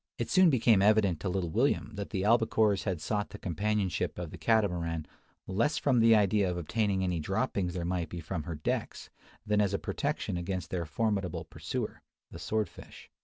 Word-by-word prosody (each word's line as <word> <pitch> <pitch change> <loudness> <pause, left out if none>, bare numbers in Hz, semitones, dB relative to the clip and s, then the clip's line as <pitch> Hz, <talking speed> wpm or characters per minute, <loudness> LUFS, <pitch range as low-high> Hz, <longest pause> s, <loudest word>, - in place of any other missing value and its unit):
It - - -3
soon 185 -2 +6
became 115 -7 +4
evident 100 -5 +3
to 90 - -2
little 90 -2 -2
William 115 - +1
that 100 -1 -5
the 95 -3 -2
albacores 110 -2 +3
had 95 -5 -1
sought 105 +5 -2
the - - -9
companionship 100 +2 -1
of 85 -3 -5
the - - -8
Catamaran 85 -8 +1 0.4
less 115 +11 0
from 130 -4 +2
the 115 0 +6
idea 100 -2 +3
of 90 - -2
obtaining 95 +3 0
any 90 -2 0
droppings 90 +3 -1
there 85 -2 -2
might 85 -2 -2
be 85 - -6
from 85 0 -4
her 85 - -4
decks, 75 - -3 0.3
than 105 -1 +2
as 100 -1 +1
a - - +1
protection 90 - -2
against 90 -1 -4
their 85 -3 -2
formidable 100 -2 -1
pursuer, - - -5 0.3
the - - -9
sword 110 -2 -1
fish. - - -14
100 Hz, 190 wpm, -30 LUFS, 90-110 Hz, 0.4 s, soon